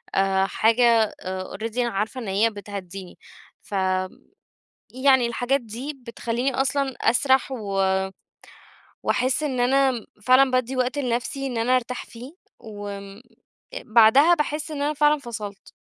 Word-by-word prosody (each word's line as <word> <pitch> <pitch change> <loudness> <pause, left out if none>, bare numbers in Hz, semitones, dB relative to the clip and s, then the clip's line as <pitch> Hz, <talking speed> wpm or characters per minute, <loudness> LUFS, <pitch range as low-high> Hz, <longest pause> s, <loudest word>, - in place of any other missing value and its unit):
آآ 195 0 +2
حاجة 225 +1 +3
already 190 +5 -5
أنا 240 -1 +1
عارفة 220 +4 -3
إن 225 - -7
هي 200 +4 +2
بتهدّيني، 195 -3 -9 0.5
فيعني 190 +5 -2 1.0
الحاجات 245 +4 0
دي 240 +6 -6
بتخلّيني 240 +3 -2
أصلًا 270 0 0
أسرَح 265 +3 +2
و 195 -5 0 1.0
وأحس 255 +4 0
إن 265 -5 -1
أنا 260 -2 +2 0.2
فعلًا 260 +3 +5
بادّي 255 0 0
وقت 255 +3 0
لنفسي 255 +1 -2
إن 245 -3 -3
أنا 245 +3 +2
أرتاح 250 0 -4
فيه، 245 +4 -11 0.3
وامم 205 -2 -9 0.6
بعدها 235 +9 +6
باحس 300 0 -3
إن 290 -2 -4
أنا 295 +1 0
فعلًا 300 0 +3
فصلت. 215 -6 -8
235 Hz, 125 wpm, -24 LUFS, 205-265 Hz, 1.0 s, بعدها